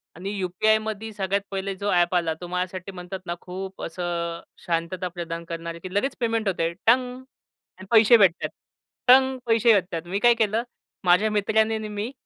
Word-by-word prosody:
आणि 190 +4 -6
यू-पी-आयमध्ये 215 +4 0
सगळ्यात 195 0 -1
पहिले 195 0 -3
जो 200 +2 -2
ॲप 175 0 +2
आला 165 -2 +1
तो 175 - -6
माझ्यासाठी 180 +1 -4
म्हणतात 185 0 -7
ना 175 0 -3
खूप 190 +1 -7
असं 170 -1 -3 0.2
शांतता 170 +2 -2
प्रदान 170 -1 -6
करणारे 170 0 -5
की 185 +1 -8
लगेच 265 +8 0
पेमेंट 225 -3 0
होते 170 -3 0
टंग! 250 +2 +2 0.6
आणि 190 - -11
पैसे 225 +1 +7
भेटत 190 -6 +5
आहेत - - -1 0.6
टंग! 260 +1 +6
पैसे 230 0 +4
भेटत 185 -3 0
आहेत. 165 +1 -4
मी 195 +3 -2
काय 240 +2 +6
केलं? 225 0 0 0.4
माझ्या 180 +4 +4
मित्राने 220 +1 +2
आणि 215 0 -4
मी 210 +4 -4
195 Hz, 175 wpm, -24 LUFS, 175-220 Hz, 0.6 s, पैसे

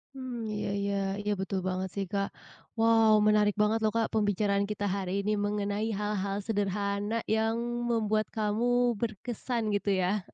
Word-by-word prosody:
Mmm, 250 -4 -5
iya 210 - -2
iya 200 0 -1 0.3
iya 210 0 -1
betul 190 0 -1
banget, 185 0 -2
sih, 200 -1 -1
Kak. 200 -1 0 0.5
Wow 225 -1 +5
menarik 210 -1 +4
banget, 215 +2 +3
loh, 215 - +3
Kak, 225 -1 +2
pembicaraan 205 -1 +2
kita 205 -1 -2
hari 190 -2 -3
ini 205 +1 0
mengenai 205 +1 -1
hal-hal 200 -1 -1
sederhana 205 +1 -1
yang 220 +1 +1 0.3
membuat 215 -1 +1
kamu 240 +3 +1
berkesan 235 +2 -3
gitu 205 0 -1
ya. 190 +2 0
210 Hz, 150 wpm, -29 LUFS, 200-225 Hz, 0.5 s, Wow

